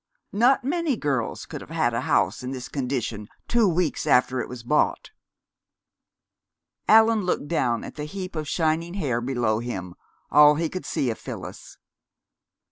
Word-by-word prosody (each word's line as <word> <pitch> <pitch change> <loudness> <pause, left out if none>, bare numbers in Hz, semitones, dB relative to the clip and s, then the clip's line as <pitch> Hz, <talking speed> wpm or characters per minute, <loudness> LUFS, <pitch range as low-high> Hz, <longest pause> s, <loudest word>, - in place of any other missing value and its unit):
Not 245 +6 +4
many 310 -1 0
girls 135 - -2
could - - -8
have - - -12
had - - 0
a - - -1
house - - +1
in 125 - -5
this 130 -1 -6
condition 125 -6 -3 0.2
two 235 -3 +3
weeks 165 -2 -1
after 130 -2 +3
it - - -6
was 125 -2 -8
bought." 150 - 0 1.8
Allan 220 0 +6
looked 180 -5 -1
down 120 -8 0
at - - -8
the 150 - -4
heap 185 +3 -7
of 155 -1 -3
shining 165 +3 0
hair 130 -11 -1
below 120 -4 0
him, 95 -7 -5 0.4
all 150 0 +7
he 160 +1 -1
could 185 - -6
see 125 - 0
of 110 - -7
Phyllis. - - -9
150 Hz, 160 wpm, -25 LUFS, 125-185 Hz, 1.8 s, all